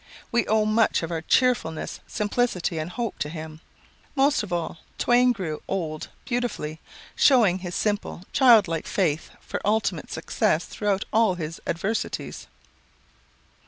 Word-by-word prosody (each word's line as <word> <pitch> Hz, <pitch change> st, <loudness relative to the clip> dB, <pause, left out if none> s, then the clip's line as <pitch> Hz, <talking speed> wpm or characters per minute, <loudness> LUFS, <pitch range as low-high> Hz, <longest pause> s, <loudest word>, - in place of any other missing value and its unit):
We 235 Hz, -, +2 dB
owe 215 Hz, 0 st, +3 dB
much 215 Hz, -3 st, +2 dB
of 165 Hz, -, -4 dB
our 165 Hz, -1 st, -2 dB
cheerfulness, 225 Hz, -6 st, +1 dB
simplicity, 205 Hz, -6 st, -1 dB
and 155 Hz, +2 st, -3 dB
hope 235 Hz, +3 st, -4 dB
to 145 Hz, -, -2 dB
him. 155 Hz, 0 st, -8 dB, 0.5 s
Most 280 Hz, +1 st, +3 dB
of 210 Hz, -3 st, -7 dB
all, 170 Hz, -1 st, -2 dB, 0.2 s
Twain 245 Hz, +1 st, +4 dB
grew 180 Hz, -9 st, -4 dB
old 160 Hz, -5 st, -3 dB, 0.2 s
beautifully, 240 Hz, -11 st, -2 dB, 0.4 s
showing 220 Hz, -10 st, +5 dB
his 180 Hz, -1 st, -5 dB
simple, 205 Hz, -4 st, -1 dB
childlike 215 Hz, -, +5 dB
faith 165 Hz, -6 st, 0 dB
for -, -, -5 dB
ultimate 215 Hz, +2 st, 0 dB
success -, -, 0 dB
throughout 205 Hz, -2 st, -1 dB
all 220 Hz, -4 st, +4 dB
his 165 Hz, -2 st, -6 dB
adversities." 195 Hz, +7 st, -3 dB
195 Hz, 130 wpm, -25 LUFS, 165-230 Hz, 0.5 s, showing